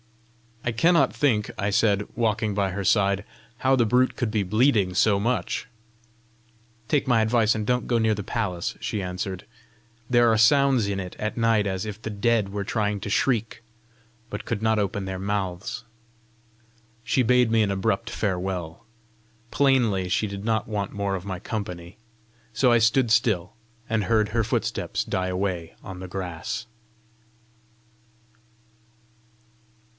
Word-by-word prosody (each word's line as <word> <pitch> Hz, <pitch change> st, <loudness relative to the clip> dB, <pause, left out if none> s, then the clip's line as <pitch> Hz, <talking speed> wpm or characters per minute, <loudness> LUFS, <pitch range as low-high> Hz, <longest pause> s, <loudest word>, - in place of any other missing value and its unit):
"I 120 Hz, -, 0 dB
cannot 165 Hz, +10 st, +3 dB
think," 110 Hz, -8 st, +1 dB
I 100 Hz, 0 st, -1 dB
said, 100 Hz, 0 st, +2 dB
walking 110 Hz, -2 st, 0 dB
by 100 Hz, -1 st, 0 dB
her 100 Hz, +2 st, -3 dB
side, 100 Hz, 0 st, +2 dB, 0.3 s
"how 130 Hz, +2 st, +3 dB
the 120 Hz, -3 st, +3 dB
brute 125 Hz, +3 st, +2 dB
could 120 Hz, -, -1 dB
be 105 Hz, -1 st, 0 dB
bleeding 105 Hz, -1 st, +2 dB
so 100 Hz, +2 st, +3 dB
much!" 120 Hz, +1 st, -1 dB, 1.2 s
"Take 140 Hz, +1 st, +1 dB
my 120 Hz, -3 st, +4 dB
advice, 110 Hz, 0 st, +3 dB
and 110 Hz, -1 st, -2 dB
don't 125 Hz, +1 st, 0 dB
go 120 Hz, -, +2 dB
near 110 Hz, -1 st, +2 dB
the 105 Hz, -, -5 dB
palace," 95 Hz, -6 st, -2 dB
she 105 Hz, -, -3 dB
answered. 90 Hz, 0 st, -4 dB, 0.6 s
"There 120 Hz, -2 st, +5 dB
are 110 Hz, -, +3 dB
sounds 130 Hz, -1 st, +4 dB
in 100 Hz, -1 st, -2 dB
it 90 Hz, -2 st, -6 dB
at 105 Hz, +2 st, -3 dB
night 115 Hz, -2 st, +2 dB
as 95 Hz, +1 st, -2 dB
if 105 Hz, 0 st, -7 dB
the 110 Hz, -, -5 dB
dead 105 Hz, 0 st, +1 dB
were 100 Hz, 0 st, -3 dB
trying 105 Hz, 0 st, -1 dB
to -, -, -5 dB
shriek, 115 Hz, 0 st, 0 dB, 0.7 s
but 105 Hz, -, -6 dB
could 105 Hz, -, -3 dB
not 110 Hz, -1 st, +2 dB
open 100 Hz, -1 st, -2 dB
their 95 Hz, -1 st, -4 dB
mouths!" 100 Hz, +3 st, -3 dB, 1.2 s
She 130 Hz, -, +1 dB
bade 125 Hz, -1 st, +3 dB
me 115 Hz, -1 st, +4 dB
an 100 Hz, -, 0 dB
abrupt 95 Hz, +3 st, -1 dB
farewell. 90 Hz, -6 st, -3 dB, 0.6 s
Plainly 115 Hz, -8 st, +2 dB
she 105 Hz, +3 st, +1 dB
did 100 Hz, 0 st, -7 dB
not 110 Hz, -2 st, 0 dB
want 105 Hz, -2 st, -3 dB
more 100 Hz, -1 st, -1 dB
of 95 Hz, 0 st, -6 dB
my 95 Hz, -3 st, -4 dB
company; 90 Hz, -3 st, -6 dB, 0.6 s
so 125 Hz, +3 st, +3 dB
I 120 Hz, -, +6 dB
stood 115 Hz, +2 st, +3 dB
still, 110 Hz, -4 st, +2 dB, 0.4 s
and 110 Hz, -1 st, +1 dB
heard 110 Hz, +1 st, +2 dB
her 115 Hz, +1 st, 0 dB
footsteps -, -, -2 dB
die 95 Hz, 0 st, -2 dB
away 90 Hz, -3 st, -3 dB
on 95 Hz, -2 st, -8 dB
the 95 Hz, -, -7 dB
grass. 90 Hz, +4 st, -5 dB
105 Hz, 155 wpm, -25 LUFS, 95-115 Hz, 1.2 s, I